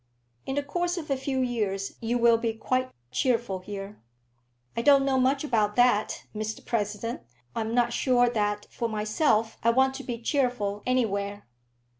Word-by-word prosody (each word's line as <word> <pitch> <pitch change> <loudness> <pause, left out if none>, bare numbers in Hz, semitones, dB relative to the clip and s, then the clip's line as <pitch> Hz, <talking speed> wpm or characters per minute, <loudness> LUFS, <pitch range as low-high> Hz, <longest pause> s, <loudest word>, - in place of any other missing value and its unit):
"In 265 - -2
the 285 - 0
course 350 +5 -1
of 305 -4 -5
a - - +3
few 265 0 -2
years 210 -6 -1
you 235 +1 0
will 235 -1 +5
be 230 -1 -1
quite 255 +3 -1 0.2
cheerful 230 - 0
here." 195 - -8 0.7
"I 230 - 0
don't 275 +2 +5
know 265 -1 +2
much 270 +3 +2
about 215 -7 +1
that, 245 -4 +3
Mr 215 +1 -4
President. 215 +1 -2 0.3
I'm 225 +1 -2
not 240 -1 +2
sure 245 -1 +3
that 210 -3 -1
for 235 - -2
myself 215 +1 +1
I 230 - +3
want 265 +3 +3
to 275 +1 -7
be 240 -3 -4
cheerful 240 -6 0
anywhere. 205 -5 0
235 Hz, 165 wpm, -27 LUFS, 210-260 Hz, 0.7 s, will